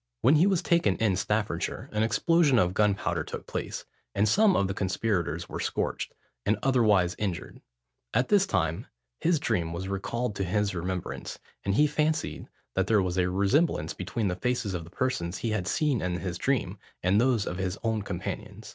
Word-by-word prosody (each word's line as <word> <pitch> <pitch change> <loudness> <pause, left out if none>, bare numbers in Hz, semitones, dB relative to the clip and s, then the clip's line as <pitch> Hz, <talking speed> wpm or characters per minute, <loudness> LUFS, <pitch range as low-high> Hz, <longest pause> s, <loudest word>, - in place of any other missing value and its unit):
When 150 - +5
he 175 +6 +5
was 190 -4 +2
taken 170 0 +3
in 105 -4 +1
Staffordshire, 105 +2 -1
an 105 - 0
explosion 135 +6 +3
of 90 -4 +3
gunpowder 105 -1 +1
took - - -7
place, - - -4 0.3
and 105 - +3
some 205 - +4
of 100 - +2
the 95 - -2
conspirators 90 -4 -1
were - - -6
scorched, - - -2 0.3
and 105 - +2
otherwise 105 -9 +3
injured; 95 -5 -4 0.5
at 125 - +1
this 200 -1 +4
time, 80 - -1 0.3
his 165 -2 +2
dream 85 - -1
was 90 +3 -4
recalled 105 +4 -2
to 95 - 0
his 100 +2 0
remembrance, 90 0 -4 0.3
and 100 0 0
he 150 - +5
fancied 155 +1 -1 0.3
that 95 0 +1
there 110 -1 +4
was 90 0 -1
a 90 0 +2
resemblance 100 - +1
between 95 +4 -2
the 90 - -1
faces 115 +1 -1
of 85 -2 -4
the - - -12
persons 95 -7 -2
he 115 - -2
had 105 -4 -1
seen 145 -2 +1
in 90 -1 -1
his 90 -2 -4
dream, 105 -8 0 0.2
and 95 +4 +4
those 120 -5 +2
of 90 - -4
his 95 +1 -2 0.3
companions. 100 +3 -6
105 Hz, 180 wpm, -28 LUFS, 90-125 Hz, 0.5 s, When